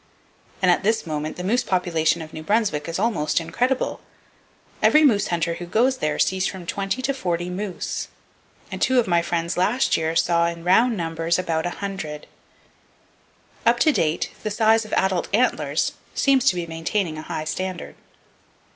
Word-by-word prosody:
And 180 Hz, -, +6 dB
at 175 Hz, -, +2 dB
this 220 Hz, +3 st, +1 dB
moment, 155 Hz, -1 st, -4 dB
the 180 Hz, -, -5 dB
moose 230 Hz, +7 st, +2 dB
population 170 Hz, -3 st, 0 dB
of 155 Hz, -, -12 dB
New 155 Hz, -, -6 dB
Brunswick 185 Hz, -5 st, 0 dB
is 165 Hz, -, -3 dB
almost 195 Hz, -9 st, +1 dB
incredible. 245 Hz, +11 st, -1 dB, 0.8 s
Every 305 Hz, +1 st, +5 dB
moose 220 Hz, -9 st, +4 dB
hunter 170 Hz, -1 st, 0 dB
who 175 Hz, +1 st, -7 dB
goes 250 Hz, +8 st, +2 dB
there 155 Hz, -9 st, -1 dB
sees 190 Hz, 0 st, +1 dB
from 185 Hz, -3 st, -7 dB
20 195 Hz, +8 st, -2 dB
to 275 Hz, -, +1 dB
40 175 Hz, -8 st, -2 dB
moose, 190 Hz, 0 st, -4 dB, 0.6 s
and -, -, -6 dB
two 260 Hz, -1 st, +4 dB
of 240 Hz, -, +2 dB
my 170 Hz, -2 st, +3 dB
friends 170 Hz, 0 st, -2 dB
last 215 Hz, +9 st, +2 dB
year 160 Hz, 0 st, -1 dB
saw, 170 Hz, 0 st, +3 dB
"in 170 Hz, 0 st, -5 dB
round 225 Hz, +6 st, +3 dB
numbers, 165 Hz, 0 st, -1 dB
about 165 Hz, -3 st, -1 dB
100!" 175 Hz, -5 st, -5 dB, 1.4 s
Up 235 Hz, +1 st, +4 dB
to 310 Hz, -, +5 dB
date 160 Hz, -, 0 dB
the 215 Hz, -, -2 dB
size 220 Hz, +1 st, +3 dB
of 215 Hz, -, -9 dB
adult 190 Hz, -2 st, +1 dB
antlers 250 Hz, +3 st, +1 dB, 0.2 s
seem 275 Hz, -1 st, +4 dB
to 265 Hz, -6 st, +3 dB
be 175 Hz, -1 st, -2 dB
maintaining 165 Hz, 0 st, -2 dB
a 155 Hz, -, -10 dB
high 155 Hz, -, -3 dB
standard. 185 Hz, +3 st, -4 dB
180 Hz, 170 wpm, -23 LUFS, 165-220 Hz, 1.4 s, And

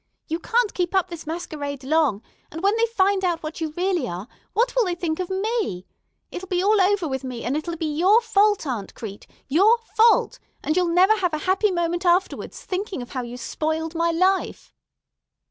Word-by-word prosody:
You 325 Hz, +1 st, -2 dB
can't 460 Hz, +4 st, +1 dB
keep 355 Hz, +1 st, -1 dB
up 375 Hz, -2 st, +1 dB
this 330 Hz, -2 st, -8 dB
masquerade 295 Hz, -4 st, -5 dB
long; 280 Hz, -7 st, +1 dB, 0.3 s
and, 325 Hz, +4 st, -7 dB
when 400 Hz, +2 st, +3 dB
they 460 Hz, +1 st, +2 dB
find 395 Hz, -3 st, +1 dB
out 345 Hz, -3 st, 0 dB
what 310 Hz, +2 st, -6 dB
you 320 Hz, -, -1 dB
really 355 Hz, -7 st, 0 dB
are, 180 Hz, +3 st, -6 dB, 0.3 s
what -, -, +1 dB
will -, -, +3 dB
they 355 Hz, -2 st, -1 dB
think 330 Hz, -2 st, -3 dB
of 365 Hz, -, -3 dB
me? 385 Hz, -, -2 dB, 0.5 s
It'll 380 Hz, +2 st, -7 dB
be 365 Hz, -1 st, 0 dB
all 415 Hz, 0 st, +4 dB
over 380 Hz, -2 st, +2 dB
with 265 Hz, -2 st, -3 dB
me, 250 Hz, -3 st, -6 dB
and 255 Hz, -, -1 dB
it'll 335 Hz, +3 st, -3 dB
be 320 Hz, -, -3 dB
your 395 Hz, +6 st, +6 dB
fault, 415 Hz, -4 st, +2 dB
Aunt 235 Hz, -8 st, -4 dB
Crete, 205 Hz, -4 st, -8 dB, 0.2 s
your 395 Hz, -, +5 dB, 0.2 s
fault, 450 Hz, +1 st, +4 dB, 0.2 s
and 310 Hz, -, 0 dB
you'll 360 Hz, -1 st, +2 dB
never 370 Hz, +6 st, +4 dB
have 360 Hz, -5 st, 0 dB
a 305 Hz, -, -5 dB
happy 385 Hz, +3 st, +2 dB
moment 345 Hz, -1 st, -1 dB
afterwards, 360 Hz, +1 st, 0 dB
thinking 375 Hz, -7 st, -3 dB
of 245 Hz, -, -13 dB
how 255 Hz, -, -3 dB
you 240 Hz, 0 st, -7 dB
spoiled 315 Hz, +6 st, -3 dB
my 335 Hz, 0 st, +1 dB
life." 370 Hz, +3 st, 0 dB
345 Hz, 200 wpm, -23 LUFS, 310-390 Hz, 0.5 s, your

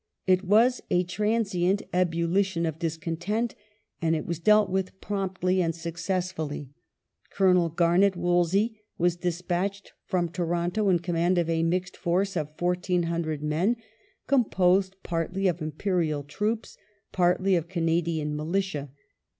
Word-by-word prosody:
It 185 Hz, 0 st, +3 dB
was 225 Hz, +6 st, +4 dB
a 180 Hz, 0 st, +3 dB
transient 200 Hz, -1 st, 0 dB
ebullition 175 Hz, +1 st, +1 dB
of 160 Hz, -1 st, -3 dB
discontent, 170 Hz, +8 st, -2 dB, 0.5 s
and 165 Hz, -1 st, +2 dB
it 155 Hz, -, -3 dB
was 170 Hz, -2 st, -3 dB
dealt 210 Hz, +3 st, +5 dB
with 190 Hz, 0 st, -2 dB
promptly 190 Hz, -2 st, -1 dB
and 165 Hz, -2 st, 0 dB
successfully. 170 Hz, -4 st, -3 dB, 0.6 s
Colonel 180 Hz, -3 st, +3 dB
Garnet 175 Hz, +4 st, +3 dB
Wolseley 175 Hz, +5 st, +1 dB, 0.2 s
was 175 Hz, 0 st, +2 dB
despatched 180 Hz, +3 st, -2 dB
from 175 Hz, -2 st, 0 dB
Toronto 175 Hz, +4 st, 0 dB
in 180 Hz, -, +4 dB
command 175 Hz, +1 st, +1 dB
of 170 Hz, -1 st, +1 dB
a 165 Hz, 0 st, +1 dB
mixed 180 Hz, +2 st, -1 dB
force 185 Hz, +3 st, 0 dB
of 155 Hz, -3 st, -2 dB
1,400 170 Hz, -3 st, -1 dB
men, 165 Hz, +10 st, +1 dB, 0.5 s
composed 190 Hz, -7 st, +2 dB
partly 180 Hz, +3 st, -1 dB
of 175 Hz, -2 st, -1 dB
Imperial 155 Hz, -1 st, -1 dB
troops, 210 Hz, +11 st, -3 dB, 0.3 s
partly 185 Hz, +1 st, +2 dB
ol" 170 Hz, -, +2 dB
Canadian 165 Hz, -2 st, -1 dB
Militia. 155 Hz, -2 st, -2 dB
175 Hz, 125 wpm, -27 LUFS, 165-190 Hz, 0.6 s, dealt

